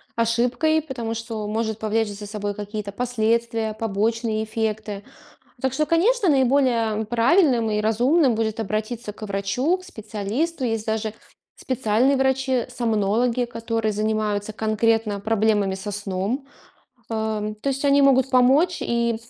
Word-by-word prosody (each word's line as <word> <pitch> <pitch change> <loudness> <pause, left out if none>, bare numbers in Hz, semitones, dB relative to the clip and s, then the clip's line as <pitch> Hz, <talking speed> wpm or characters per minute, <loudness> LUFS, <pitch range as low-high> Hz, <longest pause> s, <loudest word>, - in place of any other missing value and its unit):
ошибкой, 245 +7 +1
потому 235 -6 -4
что 225 -2 -5
может 220 0 -2
повлечь 220 0 0
за 205 0 -8
собой 205 -1 -3
какие-то 205 0 -5
последствия, 230 -1 0
побочные 220 +1 -1
эффекты. 215 -2 -3 0.6
Так 265 0 -1
что, 305 - +1
конечно, 375 +5 +3
наиболее, 255 -4 +3
м, 220 - -3
правильным 240 - +3
и 210 0 0
разумным 245 +6 +3
будет 220 0 -1
обратиться 215 +2 -3
к - - -18
врачу, 200 - 0
к 370 - -14
специалисту. 230 - -3
Есть 225 -2 -2
даже 220 -1 -1 0.4
специальные 255 +1 +1
врачи-сомнологи, 245 -3 +1
которые 230 -2 -2
занимаются 215 0 -1
конкретно 220 -1 +1
проблемами 210 -2 +1
со 190 +2 -5
сном. 205 +6 -3 0.7
Ам, 215 -1 -2
то 275 +6 -2
есть 275 +1 -3
они 280 0 +5
могут 265 -1 +4
помочь. 275 +8 +4
И, 235 -1 0
225 Hz, 130 wpm, -23 LUFS, 215-255 Hz, 0.7 s, они